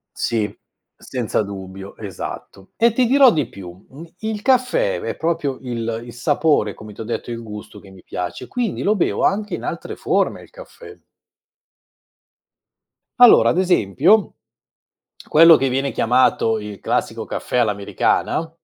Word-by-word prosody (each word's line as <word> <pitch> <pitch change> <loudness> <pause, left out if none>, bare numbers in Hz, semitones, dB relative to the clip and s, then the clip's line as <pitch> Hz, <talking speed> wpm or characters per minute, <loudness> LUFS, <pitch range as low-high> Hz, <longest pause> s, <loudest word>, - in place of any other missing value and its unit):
Sì, 110 -3 -2 0.4
senza 120 -5 -2
dubbio, 95 -1 -8
esatto, 95 -1 -8
e 230 0 +3
ti 250 +1 +2
dirò 270 0 +6
di 145 -6 -1
più, 90 -1 -11 0.4
il 220 -1 -4
caffè 475 - +2
è 455 - -4
proprio 160 -5 -1
il 115 -3 -4
il 120 - -10
sapore 145 -4 +1
come 105 0 -11
t'ho 110 - -7
detto, 120 +1 -5
il 115 0 -5
gusto 105 -1 -10
che 100 - -16
mi 95 -1 -16
piace, 90 -1 -6
quindi 245 -5 -3
lo 210 - +2
bevo 190 - 0
anche 210 +1 0
in - - -8
altre - - -5
forme - - -1
il - - -18
caffè. 485 -3 -13 2.2
Allora 245 -2 +7
ad 180 - +1
esempio 180 - +2 0.9
quello 165 +1 +7
che 135 - 0
viene 135 +2 -1
chiamato 115 -2 +2
il 105 -1 -8
classico - - -2
caffè - - -4
all'americana 110 +8 0
130 Hz, 140 wpm, -20 LUFS, -, 2.2 s, Allora